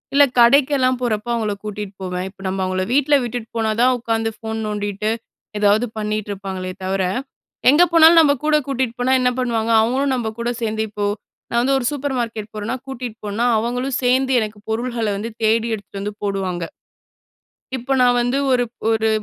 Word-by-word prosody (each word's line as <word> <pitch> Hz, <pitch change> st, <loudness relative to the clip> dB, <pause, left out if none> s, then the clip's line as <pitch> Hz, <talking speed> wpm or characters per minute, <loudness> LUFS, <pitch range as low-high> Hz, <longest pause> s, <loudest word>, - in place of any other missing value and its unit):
இல்லை 285 Hz, 0 st, +7 dB
கடைக்கெல்லாம் 255 Hz, 0 st, +4 dB
போறப்போ, 225 Hz, 0 st, -1 dB
அவங்களை 215 Hz, -3 st, -1 dB
கூட்டிகிட்டு 205 Hz, -2 st, -6 dB
போவேன். 180 Hz, 0 st, -3 dB
இப்போ 195 Hz, 0 st, -18 dB
நம்ம 190 Hz, 0 st, -3 dB
அவங்கள 185 Hz, 0 st, -1 dB
வீட்டில 290 Hz, +1 st, +4 dB
விட்டுட்டு 240 Hz, -1 st, -5 dB
போனா 220 Hz, -1 st, +1 dB
தான், 255 Hz, 0 st, +4 dB
உட்காந்து 225 Hz, -1 st, -1 dB
ஃபோன் 220 Hz, 0 st, -4 dB
நோண்டிட்டு, 205 Hz, 0 st, -2 dB, 0.5 s
ஏதாவது 210 Hz, +3 st, +3 dB
பண்ணிட்டு 210 Hz, 0 st, -2 dB
இருப்பாங்களே 190 Hz, -1 st, -5 dB
தவிர, 190 Hz, 0 st, 0 dB, 0.7 s
எங்கே 325 Hz, +6 st, +6 dB
போனாலும் 330 Hz, 0 st, +8 dB
நம்ம 285 Hz, -2 st, +4 dB
கூட 305 Hz, 0 st, +3 dB
கூட்டிட்டு 260 Hz, -3 st, -1 dB
போனா 255 Hz, +2 st, +2 dB
என்ன 250 Hz, -, +3 dB
பண்ணுவாங்க? 230 Hz, -2 st, 0 dB
அவங்களும் 265 Hz, +4 st, +1 dB
நம்ம 240 Hz, -3 st, -2 dB
கூட 235 Hz, +1 st, -1 dB
சேர்ந்து 220 Hz, -1 st, -1 dB
இப்போ, 205 Hz, 0 st, -3 dB, 0.4 s
நான் 235 Hz, 0 st, +1 dB
வந்து 270 Hz, +2 st, +2 dB
ஒரு 245 Hz, -, -4 dB
சூப்பர் 285 Hz, -1 st, -3 dB
மார்க்கெட் 225 Hz, -2 st, -4 dB
போறேனா 215 Hz, +3 st, -3 dB
கூட்டிகிட்டு 245 Hz, -3 st, -6 dB
போனா 210 Hz, +3 st, -2 dB
அவங்களும் 250 Hz, +3 st, -1 dB
சேர்ந்து 260 Hz, +2 st, +2 dB
எனக்கு 215 Hz, -1 st, -5 dB
பொருள்கள 235 Hz, 0 st, -2 dB
வந்து 225 Hz, +3 st, -4 dB
தேடி 225 Hz, +1 st, +3 dB
எடுத்துட்டு 200 Hz, -1 st, -7 dB
வந்து 210 Hz, +1 st, -4 dB
போடுவாங்க. 190 Hz, -3 st, -2 dB, 1.1 s
இப்போ 260 Hz, +2 st, -2 dB
நான் 245 Hz, -1 st, +4 dB
வந்து 245 Hz, +3 st, 0 dB
ஒரு 250 Hz, -1 st, +3 dB, 0.3 s
ஒரு 220 Hz, 0 st, +2 dB
230 Hz, 170 wpm, -20 LUFS, 210-255 Hz, 1.1 s, போனாலும்